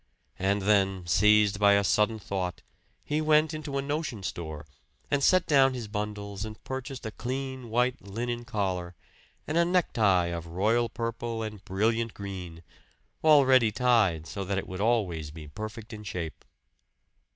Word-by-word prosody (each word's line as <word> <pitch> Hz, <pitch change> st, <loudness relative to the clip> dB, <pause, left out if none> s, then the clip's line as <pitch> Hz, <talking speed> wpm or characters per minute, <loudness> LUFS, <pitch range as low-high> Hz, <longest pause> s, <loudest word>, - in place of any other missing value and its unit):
And 100 Hz, +1 st, +1 dB
then, 95 Hz, -3 st, +2 dB
seized 105 Hz, +5 st, +4 dB
by 100 Hz, -1 st, +6 dB
a 100 Hz, 0 st, +4 dB
sudden 105 Hz, +3 st, +2 dB
thought, 95 Hz, -3 st, -4 dB, 0.4 s
he 150 Hz, +1 st, -1 dB
went 155 Hz, 0 st, +3 dB
into 150 Hz, -3 st, -4 dB
a 135 Hz, -, -1 dB
notion 140 Hz, -7 st, -3 dB
store 80 Hz, -4 st, -5 dB, 0.5 s
and 140 Hz, -1 st, +2 dB
set 185 Hz, +2 st, +4 dB
down 135 Hz, -3 st, +4 dB
his 120 Hz, -3 st, -5 dB
bundles 105 Hz, -1 st, -4 dB
and 110 Hz, 0 st, -7 dB
purchased 130 Hz, -1 st, -6 dB
a 110 Hz, -, -3 dB
clean, 130 Hz, +1 st, -5 dB
white 125 Hz, +2 st, +1 dB
linen 120 Hz, +5 st, -4 dB
collar, 95 Hz, -6 st, -2 dB, 0.5 s
and 155 Hz, -, -1 dB
a -, -, +5 dB
necktie 105 Hz, -, +2 dB
of 85 Hz, 0 st, -6 dB
royal 110 Hz, +7 st, +1 dB
purple 115 Hz, -1 st, -3 dB
and 105 Hz, -3 st, -7 dB
brilliant 115 Hz, +4 st, 0 dB
green 90 Hz, -4 st, -7 dB, 0.6 s
already 130 Hz, -7 st, +6 dB
tied, 105 Hz, -10 st, +2 dB
so 100 Hz, +4 st, -5 dB
that 95 Hz, +1 st, -2 dB
it 95 Hz, -, -3 dB
would 95 Hz, +1 st, -5 dB
always 95 Hz, -9 st, 0 dB
be 75 Hz, 0 st, -10 dB
perfect 110 Hz, +6 st, -7 dB
in 105 Hz, 0 st, -8 dB
shape. 90 Hz, -6 st, -6 dB
105 Hz, 155 wpm, -28 LUFS, 95-125 Hz, 0.6 s, by